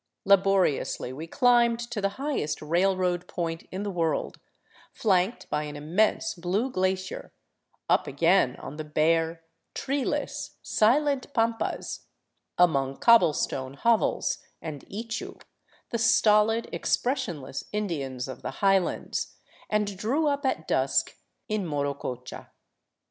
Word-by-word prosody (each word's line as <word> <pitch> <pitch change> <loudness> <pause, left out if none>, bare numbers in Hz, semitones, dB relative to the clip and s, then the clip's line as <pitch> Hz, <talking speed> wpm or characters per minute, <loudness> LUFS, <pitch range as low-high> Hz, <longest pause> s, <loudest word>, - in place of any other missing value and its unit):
Laboriously 195 -9 +2
we 155 +5 -7
climbed 240 +3 +4
to 220 -4 -2
the 200 0 -1
highest 275 - -2
railroad 180 +2 +1
point 165 -1 -4
in 190 +2 -4
the 205 - -3
world, 165 -3 -1 0.5
flanked 195 +1 +1
by 150 - +1
an 150 0 -7
immense 205 +8 +1
blue 195 +7 -1
glacier, 185 -2 -2 0.6
up - - +2
again 165 -1 +3
on 150 - -9
the 155 - -4
bare, 165 +2 +1 0.3
treeless, 275 0 -2
silent 275 +5 +2
pampas, 225 -1 -1 0.5
among 135 -6 +3
cobble 235 -8 +6
stone 130 -1 -3
hovels 230 +8 +1 0.2
and 150 -4 -7
ichu, 225 +3 -5 0.5
the 235 - -1
stolid, 225 -1 +4
expressionless 170 - -2
Indians 140 -12 -3
of 130 - -8
the - - -4
highlands, 195 -2 0 0.3
and 210 -1 0
drew 270 +10 +1
up 285 -1 +1
at - - -2
dusk - - +1 0.3
in 215 -1 -1
Morococha. 140 -5 -4
190 Hz, 115 wpm, -27 LUFS, 155-225 Hz, 0.6 s, cobble